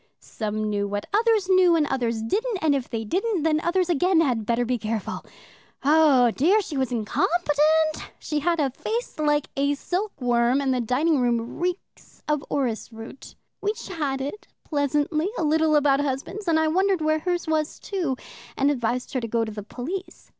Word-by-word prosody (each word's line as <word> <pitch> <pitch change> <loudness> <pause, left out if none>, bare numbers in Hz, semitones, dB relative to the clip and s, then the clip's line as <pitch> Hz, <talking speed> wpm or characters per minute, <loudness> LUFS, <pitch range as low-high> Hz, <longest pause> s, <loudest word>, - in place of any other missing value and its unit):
Some 215 -1 -4
knew 205 -1 -1
what 205 0 -3
others 440 -2 +3
knew, 370 -2 +5
and 315 -2 +3
others 235 -5 -1
didn't, 430 - -1
and 310 -2 +4
if 270 -3 -2
they 225 -2 -3
didn't, 375 - -1
then 310 -1 +2
others 360 +1 +1
again 355 +1 +3
had 245 -9 +1
better 235 +1 +1
be 245 0 -1
careful. 215 -1 -3 0.6
Oh 285 -5 +5
dear, 350 - +3
she 315 - -6
was 265 -2 -1
incompetent! 310 +6 +1
She 300 -1 -2
had 335 +2 0
a 275 -3 +1
face 450 - -4
like 295 -1 +1
a 280 +1 +1
silkworm, 260 - 0
and 270 -2 +1
the 250 - 0
dining 275 +6 +1
room 240 0 -1
reeks 360 +2 -5
of 300 -1 0
orris 245 -5 -2
root. 225 +4 -11 0.3
We 415 +1 0
chatted 295 -5 -4 0.2
pleasantly 295 +3 0
a - - -1
little 315 0 +3
about 285 -2 +4
husbands, 290 +9 -4
and 320 -1 +3
I 315 - +2
wondered 375 +2 +2
where 310 0 +2
hers 350 +1 -2
was 310 -1 -1
too, 340 -10 -3 0.4
and 275 +1 +3
advised 250 -2 -2
her 260 - 0
to 230 - -3
go 230 0 0
to 220 - -6
the 210 0 -6
police. 300 - -7
295 Hz, 180 wpm, -24 LUFS, 245-340 Hz, 0.6 s, knew